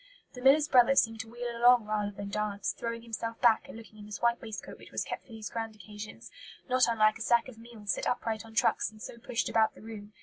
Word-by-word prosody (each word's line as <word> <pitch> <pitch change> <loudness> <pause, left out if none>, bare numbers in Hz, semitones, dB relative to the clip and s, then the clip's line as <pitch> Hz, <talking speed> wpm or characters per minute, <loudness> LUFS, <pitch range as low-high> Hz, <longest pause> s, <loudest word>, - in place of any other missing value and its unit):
The 250 - -9
miller's 285 +3 +6
brother 260 0 +5
seemed 225 -3 +3
to 225 0 -6
wheel 240 0 -5
along 240 -1 +5
rather 210 -1 -1
than 200 0 -7
dance, 205 0 -2
throwing 230 0 -4
himself 230 0 -5
back 230 -2 +4
and - - -9
looking, 215 -1 -13
in 205 - -10
his 205 -4 -6
white 235 0 +2
waistcoat 220 -2 -8
which - - -13
was - - -1
kept - - -5
for - - -29
these 220 -2 -7
grand 225 -1 -4
occasions, 210 +1 -10 0.4
not 255 -1 +4
unlike 215 -1 +3
a - - -8
sack 235 +2 +3
of 240 -4 -12
meal 230 -2 -13
set 200 - 0
upright 225 -3 -1
on 225 -1 -14
trucks - - +2
and 215 0 -16
so 235 - -9
pushed 230 0 -2
about 220 -1 +2
the - - -14
room. 215 -2 -9
225 Hz, 245 wpm, -30 LUFS, 215-235 Hz, 0.4 s, miller's